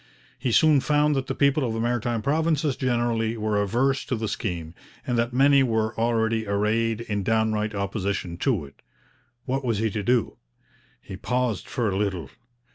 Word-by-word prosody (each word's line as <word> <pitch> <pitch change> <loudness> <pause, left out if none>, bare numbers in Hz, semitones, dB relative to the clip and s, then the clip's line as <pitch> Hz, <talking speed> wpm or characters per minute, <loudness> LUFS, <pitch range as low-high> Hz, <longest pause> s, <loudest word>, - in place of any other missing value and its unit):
He 125 - -1
soon 155 +3 +5
found 150 +1 +2
that 135 -1 -2
the - - -3
people 140 +1 +2
of 115 -3 -1
the - - -2
Maritime 120 -1 -1
Provinces 155 0 +1
generally 120 -3 0
were 105 -1 0
averse 130 +7 +1
to 130 - -1
the 110 -1 -3
scheme, 90 -5 -4 0.3
and 125 - -1
that 115 +1 +1
many 135 +2 +5
were 110 -3 0
already 115 -1 0
arrayed 110 +3 0
in 105 -4 -2
downright 110 0 0
opposition 100 -3 -3
to 110 - 0
it. 70 - -17 0.6
What 135 +2 -2
was 115 -4 0
he 110 +1 0
to 105 - -2
do? 120 +1 +1 0.7
He 95 - -8
paused 125 -2 -1
for 125 -3 -1
a 95 - -1
little. 95 -7 -2
115 Hz, 175 wpm, -25 LUFS, 105-125 Hz, 0.7 s, soon